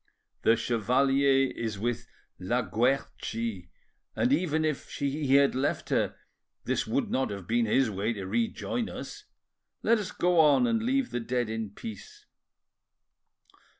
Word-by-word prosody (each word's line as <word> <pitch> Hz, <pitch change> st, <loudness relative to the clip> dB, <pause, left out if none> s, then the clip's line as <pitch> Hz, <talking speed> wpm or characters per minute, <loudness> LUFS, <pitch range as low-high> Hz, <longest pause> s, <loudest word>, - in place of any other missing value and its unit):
"The 115 Hz, -, +5 dB
chevalier 135 Hz, +4 st, +2 dB
is 110 Hz, -3 st, -3 dB
with 120 Hz, +3 st, -2 dB, 0.3 s
La 120 Hz, +7 st, 0 dB
Guerchi, 115 Hz, -5 st, -2 dB, 0.5 s
and 130 Hz, -, +2 dB
even 160 Hz, 0 st, +1 dB
if 155 Hz, -3 st, -3 dB
he 140 Hz, -1 st, 0 dB
had 140 Hz, 0 st, +5 dB
left 130 Hz, +3 st, -1 dB
her -, -, +1 dB, 0.5 s
this -, -, -1 dB
would -, -, -1 dB
not 130 Hz, -, 0 dB
have 100 Hz, -3 st, -6 dB
been 115 Hz, +3 st, +1 dB
his 125 Hz, +1 st, +2 dB
way 100 Hz, +4 st, -1 dB
to 100 Hz, -3 st, -6 dB
rejoin 115 Hz, -, -1 dB
us. 415 Hz, 0 st, -8 dB, 0.6 s
Let 230 Hz, 0 st, +4 dB
us 205 Hz, -, -4 dB
go 175 Hz, -1 st, +2 dB
on 150 Hz, -, +5 dB
and 230 Hz, -2 st, +1 dB
leave 260 Hz, +2 st, 0 dB
the 120 Hz, -, -1 dB
dead 120 Hz, -1 st, -2 dB
in 110 Hz, -2 st, -3 dB
peace." 420 Hz, -, -10 dB
130 Hz, 145 wpm, -28 LUFS, 115-155 Hz, 0.6 s, The